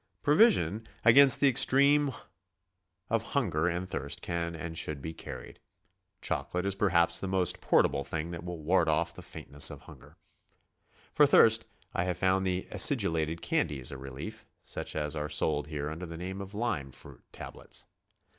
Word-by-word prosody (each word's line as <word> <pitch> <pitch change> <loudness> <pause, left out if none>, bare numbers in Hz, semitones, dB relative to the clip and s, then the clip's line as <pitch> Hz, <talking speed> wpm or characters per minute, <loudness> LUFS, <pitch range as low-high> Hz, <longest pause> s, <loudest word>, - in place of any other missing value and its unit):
Provision 130 - +3 0.2
against 135 +4 +8
the 140 - +5
extreme 140 +2 +4 1.0
of 115 -1 0
'hunger 95 - -1
and 90 +1 -3
tliirst 70 -6 -4
can 85 0 -4
and 80 0 -7
should 75 -3 -2
be 80 +4 -7
carried. - - -10 0.6
Chocolate 90 +1 -3
is 100 - 0
perhaps 85 -4 +2
the 95 - -4
mo'st 90 -2 -1
por - - +3
table 70 - -2
thing 80 +4 -5
that 85 -1 -7
will 90 -1 -6
ward 80 +1 +1
off 75 - 0
the - - -11
faintn^^ss 70 0 0
'of - - -10
hunger. - - -16 1.0
For 150 - +5
thirst 115 -4 +5 0.3
I 85 - -1
have 90 -1 -3
found 95 0 +1
the 90 0 -3
acidulated 80 0 +2
candies 65 -4 -1
a 65 - -7
relief, 65 0 -9
such - - -6
as 75 -1 -2
are 75 0 -4
sold 75 -1 -1
here 75 -2 -5
undei 80 +3 -6
the 85 - -8
name 95 +3 -6
of 100 +1 -9
lime 105 - -3
fruit - - -13
tablets. - - -8
85 Hz, 165 wpm, -29 LUFS, 80-100 Hz, 1.0 s, against